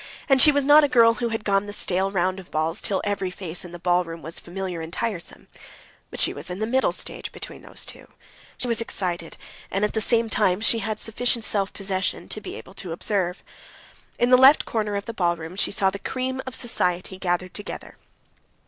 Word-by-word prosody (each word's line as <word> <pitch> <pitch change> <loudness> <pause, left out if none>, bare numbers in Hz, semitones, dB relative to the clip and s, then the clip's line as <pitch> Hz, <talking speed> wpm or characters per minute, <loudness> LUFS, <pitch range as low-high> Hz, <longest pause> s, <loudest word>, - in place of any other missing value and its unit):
And 270 -3 +5
she 300 - +10
was 285 -1 +1
not 295 +2 +8
a - - +4
girl 230 -4 +5
who 235 +1 -2
had 225 -1 -3
gone 200 0 +1
the 205 - -6
stale 190 -1 +1
round 185 0 0
of 185 - -12
balls 155 +2 -1
till 195 - 0
every 200 -2 -1
face 180 -2 -4
in 175 - -10
the 175 - -7
ballroom 175 -2 0
was 165 +1 -2
familiar 180 -1 -5
and 160 0 -7
tiresome. 205 -3 -4 0.6
But - - -8
she - - +2
was - - -4
in 180 - -4
the 215 - -1
middle 260 +4 +2
stage - - -4
between - - -9
these - - -7
two; - - -10 0.5
she 250 - 0
was 230 -1 0
excited, 175 -7 -4 0.3
and 195 +2 +1
at 210 - -3
the 220 - 0
same 230 +1 +2
time 205 -4 +2
she 225 +1 +3
had 215 0 -3
sufficient 235 +1 +1
self 200 -2 +1
possession 190 -1 -2
to 215 - -5
be - - -7
able 190 - -11
to 180 - -7
observe. 180 0 -1 0.7
In 240 +1 +2
the 255 - +9
left 270 +3 +7
corner 210 -2 -2
of 200 - -3
the 230 - -5
ballroom 170 -3 -1
she 200 - +1
saw 195 -1 +2
the 200 - -6
cream 260 +4 -3
of 260 - -3
society 185 -5 0
gathered 180 0 -1
together. 205 - -7
200 Hz, 215 wpm, -24 LUFS, 180-230 Hz, 0.7 s, she